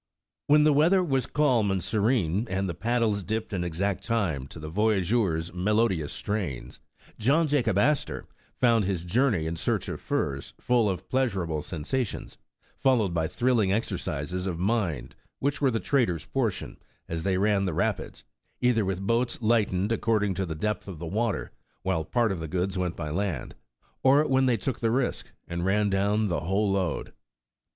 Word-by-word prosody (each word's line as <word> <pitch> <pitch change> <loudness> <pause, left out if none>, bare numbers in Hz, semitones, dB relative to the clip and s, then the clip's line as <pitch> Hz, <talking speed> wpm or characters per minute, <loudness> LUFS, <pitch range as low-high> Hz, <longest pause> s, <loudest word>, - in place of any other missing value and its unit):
When 150 +1 +6
the 150 -1 +5
weather 170 +6 +4
was 135 -6 0
calm 130 -8 +2
and 95 -2 0
serene, 105 -2 +1
and 95 +1 -1
the 85 - -2
pad 115 +7 0
dies 105 -3 +1
dipped 110 +2 -3
in 90 -2 -1
exact 90 +3 -2
time 90 - -1
to - - -11
the 75 - -7
voyageur's 95 -2 +1
melodious 95 -4 +1
strains, 95 - -4 0.4
John 145 +9 +3
Jacob 125 -9 +1
Astor 145 +8 +1 0.3
found 115 -4 +3
his 95 -3 -1
journey 110 -3 +2
in 80 +1 -3
search - - -1
of - - -5
furs 70 -2 -2
full 120 -4 +2
of 95 - -4
pleasureable 95 - 0
sensations, 95 - -4 0.4
followed 115 -9 +2
by 80 -1 0
thrill 125 +3 +1
ing 95 -3 +2
exercises 90 -4 -2
of 90 -3 -2
mind 90 - -1 0.2
which 140 +2 -1
were 140 - +4
the 115 -2 0
traders' 110 - +1
portion, 120 -7 -2 0.3
as 80 -1 -3
they 95 +1 +1
ran 100 0 +2
the 90 - -1
rapids, - - -2 0.4
either 125 -3 +3
with 95 0 -2
boats 115 +3 +1
lightened 105 -3 +1
ac 115 - +1
cording 105 -3 +1
to 95 0 -2
the 80 - -4
depth 105 +5 -2
of 95 -4 -7
the 85 - -6
water 105 +4 -1 0.2
— - - -42
while 80 - 0
part 115 +5 +1
of 95 - -3
the 80 - -4
goods 95 +3 -1
went 90 -2 -1
by 75 -3 -4
land 85 -6 -2 0.3
— - - -38
or 140 +3 +5
when 130 -1 +3
they 120 -2 +3
took 120 +6 -3
the 115 - +1
risk 125 +2 0 0.2
and 85 0 -3
ran 100 +2 +2
down 100 +2 +2
the 85 -6 0
whole 95 +6 0
load. 95 -2 -1
100 Hz, 185 wpm, -27 LUFS, 90-120 Hz, 0.4 s, When